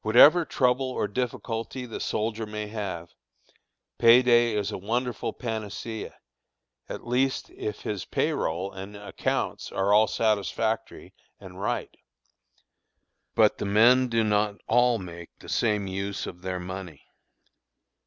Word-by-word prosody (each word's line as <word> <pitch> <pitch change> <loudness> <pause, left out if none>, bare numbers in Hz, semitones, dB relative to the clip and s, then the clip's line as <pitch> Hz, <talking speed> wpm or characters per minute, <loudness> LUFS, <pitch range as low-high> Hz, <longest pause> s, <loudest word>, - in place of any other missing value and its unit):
Whatever 145 +10 +7
trouble 130 -1 +1
or 125 - -1
difficulty 120 +2 -3
the 115 - -6
soldier 110 0 -2
may 105 0 -4
have, 95 -6 -5 0.9
pay 120 +2 +7
day 120 -2 +4
is 105 -2 -1
a - - -4
wonderful 120 +3 -2
panacea, 110 -1 -5 0.7
at - - -6
least 130 +3 0
if 105 - -5
his 100 -6 -3
pay - - 0
roll 90 +5 -2
and 95 +2 -8
accounts 100 0 -3
are 100 +1 +1
all 110 +1 +6
satisfactory 110 +2 -1 0.3
and - - -11
right. - - -2 1.4
But - - +4
the - - -2
men 120 +6 +5
do 115 -2 +1
not 105 -1 +1
all 120 0 +4
make 85 -3 -10
the - - -13
same 105 -3 +1
use 100 +1 -3
of 90 - -8
their 90 0 -3
money. 90 -4 -7
110 Hz, 135 wpm, -27 LUFS, 100-120 Hz, 1.4 s, Whatever